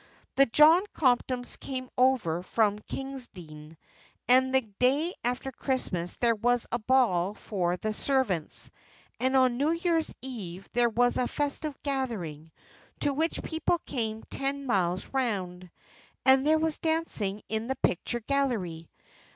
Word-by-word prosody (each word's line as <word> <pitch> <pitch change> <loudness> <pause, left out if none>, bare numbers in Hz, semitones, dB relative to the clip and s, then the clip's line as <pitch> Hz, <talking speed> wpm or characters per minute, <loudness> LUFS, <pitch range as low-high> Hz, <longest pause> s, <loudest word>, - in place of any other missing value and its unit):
The 275 0 +5
John 310 +8 +6
Comptons 250 -2 +1
came 255 -1 -5
over 250 -11 +2
from 210 +2 +1
Kingsdene, 180 - -8 0.5
and 260 +1 +5
the 265 - +5
day 255 - +1
after 250 +2 -2
Christmas 195 -10 -2
Day - - -13
there 235 -1 +4
was 245 +2 +1
a 240 - 0
ball 215 -6 +2
for 180 -4 -2
the 215 +3 -3
servants; 215 - -1 0.5
and 260 +2 +1
on 255 -2 +3
New 285 +4 +2
Year's 335 -1 0
Eve 195 -8 -6
there 240 0 +3
was 245 +2 +2
a 250 - +1
festive 290 0 -2
gathering, 205 - -3 0.5
to 285 - +1
which 320 +4 -1
people 325 +2 0
came 225 -4 -2
ten 275 +1 -3
miles 185 -6 0
round, 185 -9 -2 0.6
and 265 +1 +5
there 315 +1 +5
was 315 -1 0
dancing 315 -12 -1
in 220 +1 -2
the 265 - -1
picture 240 +5 -1
gallery. 215 - -1
245 Hz, 140 wpm, -28 LUFS, 200-275 Hz, 0.6 s, John